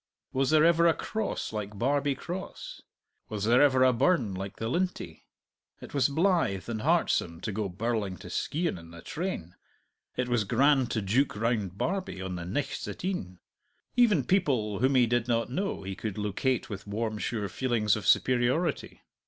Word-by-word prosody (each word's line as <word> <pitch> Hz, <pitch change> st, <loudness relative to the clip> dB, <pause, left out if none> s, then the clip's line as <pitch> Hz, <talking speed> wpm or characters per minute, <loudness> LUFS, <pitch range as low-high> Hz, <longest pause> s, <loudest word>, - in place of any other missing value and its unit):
Was 135 Hz, 0 st, +1 dB
there 155 Hz, 0 st, +5 dB
ever 170 Hz, 0 st, +5 dB
a 165 Hz, -, +4 dB
Cross 220 Hz, -, -3 dB
like 105 Hz, -1 st, -5 dB
Barbie 140 Hz, +4 st, +1 dB
Cross? 180 Hz, +6 st, -7 dB, 0.5 s
Was 105 Hz, -2 st, -3 dB
there 120 Hz, +3 st, +5 dB
ever 130 Hz, -3 st, +5 dB
a 130 Hz, -1 st, +5 dB
burn 120 Hz, -, +2 dB
like 95 Hz, +1 st, -5 dB
the 115 Hz, -, -4 dB
Lintie? 180 Hz, +8 st, -3 dB, 0.5 s
It -, -, -11 dB
was 140 Hz, 0 st, +3 dB
blithe 160 Hz, -, +1 dB
and 115 Hz, -2 st, -3 dB
heartsome 85 Hz, -5 st, +1 dB
to 110 Hz, -, -3 dB
go 100 Hz, 0 st, -2 dB
birling 100 Hz, 0 st, -2 dB
to -, -, -9 dB
Skeighan 165 Hz, -, -1 dB
in 85 Hz, 0 st, -13 dB
the 85 Hz, -1 st, -12 dB
train; 160 Hz, -, -4 dB, 0.6 s
it 125 Hz, -, 0 dB
was 120 Hz, -3 st, +1 dB
grand 130 Hz, +4 st, +3 dB
to 110 Hz, -, -1 dB
jouk 120 Hz, +8 st, +1 dB
round 105 Hz, -5 st, -1 dB
Barbie 190 Hz, -, -2 dB
on 95 Hz, -1 st, -4 dB
the 85 Hz, -1 st, -5 dB
nichts 110 Hz, +12 st, -3 dB
at -, -, -6 dB
e'en! 95 Hz, -, -3 dB, 0.6 s
Even 220 Hz, -, +4 dB
people 125 Hz, -, +1 dB
whom 130 Hz, +3 st, +3 dB
he 125 Hz, -2 st, +6 dB
did 120 Hz, 0 st, 0 dB
not 115 Hz, 0 st, 0 dB
know 190 Hz, -, -2 dB
he 95 Hz, 0 st, -4 dB
could 105 Hz, -1 st, -5 dB
locate 105 Hz, +5 st, -1 dB
with 100 Hz, -1 st, -7 dB
warm 110 Hz, +1 st, -2 dB
sure 105 Hz, -3 st, -2 dB
feelings 110 Hz, -1 st, +1 dB
of 105 Hz, -3 st, -5 dB
superiority. 130 Hz, +10 st, +1 dB
120 Hz, 175 wpm, -29 LUFS, 105-145 Hz, 0.6 s, he